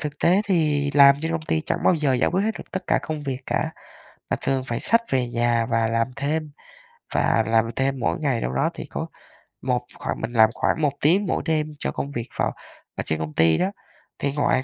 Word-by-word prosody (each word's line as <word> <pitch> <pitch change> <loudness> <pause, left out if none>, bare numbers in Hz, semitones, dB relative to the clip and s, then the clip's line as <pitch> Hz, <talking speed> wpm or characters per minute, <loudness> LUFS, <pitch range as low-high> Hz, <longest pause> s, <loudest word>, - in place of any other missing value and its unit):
thực 150 -1 -5
tế 185 +4 +4
thì 150 -6 +1
làm 140 -1 +8
trên 160 0 -1
công 165 -1 -2
ty 160 0 0
chẳng - - 0
bao 185 - +5
giờ 150 -5 +1
giải 125 - +2
quyết 190 +2 +2
hết 220 - +2
được - - -11
tất 185 - -3
cả - - +3
công 155 -2 -4
việc 135 -3 -3
cả, - - 0 0.6
mà - - +2
thường 135 -1 0
phải 120 - -3
xách 230 - +3
về 125 -2 +1
nhà 120 -1 +1
và 115 -1 +1
làm 115 0 +1
thêm, 150 +2 -2 0.6
và 115 - +3
làm 115 0 +3
thêm 135 0 0
mỗi 115 - 0
ngày 135 -6 0
đâu 60 - -2
đó 65 - +1
thì - - -7
có - - -5 0.5
một 125 -1 0
khoảng - - -4
mình 115 +1 -4
làm 110 -2 +6
khoảng 160 - 0
1 145 - +3
tiếng 180 +8 +3
mỗi - - -1
đêm 155 -2 0
cho - - -2
công 140 - -4
việc 120 -3 -4
phòng - - 0 0.4
ở - - -3
trên 80 - -1
công 80 -1 -4
ty 80 0 +4
đó. 190 - 0 0.5
Thì 140 - 0
ngoài 140 -3 +1
140 Hz, 235 wpm, -24 LUFS, 115-155 Hz, 0.6 s, làm